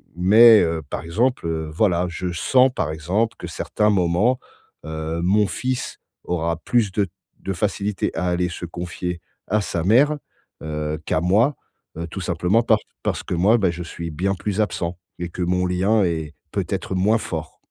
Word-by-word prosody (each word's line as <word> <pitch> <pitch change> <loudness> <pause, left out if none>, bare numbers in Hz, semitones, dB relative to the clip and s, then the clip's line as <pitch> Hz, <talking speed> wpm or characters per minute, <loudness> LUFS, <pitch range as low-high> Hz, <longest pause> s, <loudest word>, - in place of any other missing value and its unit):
mais, 110 +5 +7
heu, 80 -1 0
par - - -3
exemple, 110 +4 0
heu, 80 -1 -2
voilà, 90 -1 +2
je 90 +1 -4
sens, 125 +9 +3
par 85 -5 -1
exemple, 95 +9 -1
que - - -7
certains 105 0 0
moments, 100 +6 +2 0.5
heu, 80 +1 -4
mon 100 +3 +3
fils 125 +8 -3 0.2
aura 85 -1 -1
plus 105 +4 +1
de 100 -1 +1 0.3
de 95 - -3
facilité 100 +2 -1
à 80 - -1
aller 90 0 +1
se 85 - -6
confier 90 +1 -5 0.3
à 105 +2 +1
sa 85 -4 -2
mère, 135 - +4 0.5
heu, 75 0 -3
qu'à 80 - 0
moi, 105 - +3 0.4
heu, 85 +1 -4
tout 95 - -6
simplement 90 +6 +1
par 110 -2 +4 0.2
parce - - -1
que - - -4
moi, 100 +7 +4
bah, 95 -4 +2
je 85 +1 -6
suis 85 0 -6
bien 95 +6 0
plus 105 +1 -3
absent 90 -4 -2 0.2
et 85 -1 -3
que 90 - -6
mon 90 +1 +1
lien 95 +4 +2
est 80 -3 -2 0.2
peut-être 95 - -2
moins 105 +5 +3
fort. 80 -6 -5
90 Hz, 175 wpm, -22 LUFS, 85-105 Hz, 0.5 s, mais